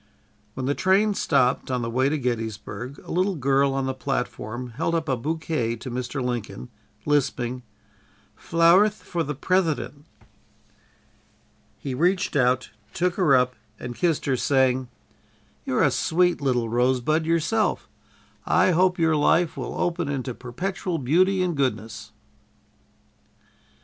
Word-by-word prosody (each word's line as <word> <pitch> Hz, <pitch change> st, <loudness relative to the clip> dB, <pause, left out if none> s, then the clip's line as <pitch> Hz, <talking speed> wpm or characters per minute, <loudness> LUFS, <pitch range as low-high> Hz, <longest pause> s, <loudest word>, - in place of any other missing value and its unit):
'" -, -, -38 dB
When 130 Hz, -, -3 dB
the 140 Hz, -, +1 dB
train 195 Hz, +6 st, +2 dB
stopped, 135 Hz, -9 st, +1 dB
on 125 Hz, -2 st, -1 dB
the -, -, -2 dB
way 130 Hz, +3 st, +2 dB
to 155 Hz, -, 0 dB
Gettysburg, 120 Hz, +1 st, -4 dB
a -, -, -8 dB
little 185 Hz, +2 st, +1 dB
girl 135 Hz, -1 st, +2 dB
on 135 Hz, -1 st, -1 dB
the 130 Hz, -, -1 dB
platform 125 Hz, -2 st, -4 dB
held 165 Hz, +7 st, -1 dB
up 160 Hz, -1 st, -1 dB
a 130 Hz, -, +1 dB
bouquet 150 Hz, -3 st, -2 dB
to 120 Hz, +2 st, -8 dB
Mr. 125 Hz, +2 st, -3 dB
Lincoln, 120 Hz, -, -4 dB, 0.4 s
lisping: 130 Hz, -4 st, 0 dB, 0.7 s
"Flowerth 175 Hz, +6 st, +4 dB
for 175 Hz, -, -3 dB
the 150 Hz, -2 st, -3 dB
Prethident." 155 Hz, -2 st, -1 dB, 1.7 s
He 135 Hz, -, -5 dB
reached 180 Hz, +7 st, +1 dB
out, 125 Hz, -3 st, +2 dB, 0.2 s
took 180 Hz, +1 st, 0 dB
her 175 Hz, -7 st, +3 dB
up 125 Hz, 0 st, +2 dB, 0.3 s
and 125 Hz, -, -6 dB
kissed 165 Hz, +3 st, 0 dB
her, 135 Hz, -, +1 dB
saying: 130 Hz, -1 st, +2 dB, 0.8 s
"You're -, -, +1 dB
a -, -, +4 dB
sweet 175 Hz, 0 st, +1 dB
little 125 Hz, -4 st, +1 dB
rosebud 130 Hz, +7 st, +1 dB
yourself. 170 Hz, +7 st, 0 dB, 0.6 s
I -, -, +3 dB
hope 180 Hz, +1 st, +3 dB
your 160 Hz, -2 st, +2 dB
life 165 Hz, +3 st, +2 dB
will -, -, -5 dB
open 170 Hz, -3 st, -1 dB
into 130 Hz, -3 st, -3 dB
perpetual 175 Hz, +9 st, -4 dB
beauty 185 Hz, +8 st, +2 dB
and 175 Hz, -3 st, -1 dB
goodness." 115 Hz, -6 st, -3 dB
140 Hz, 140 wpm, -24 LUFS, 125-170 Hz, 1.7 s, Flowerth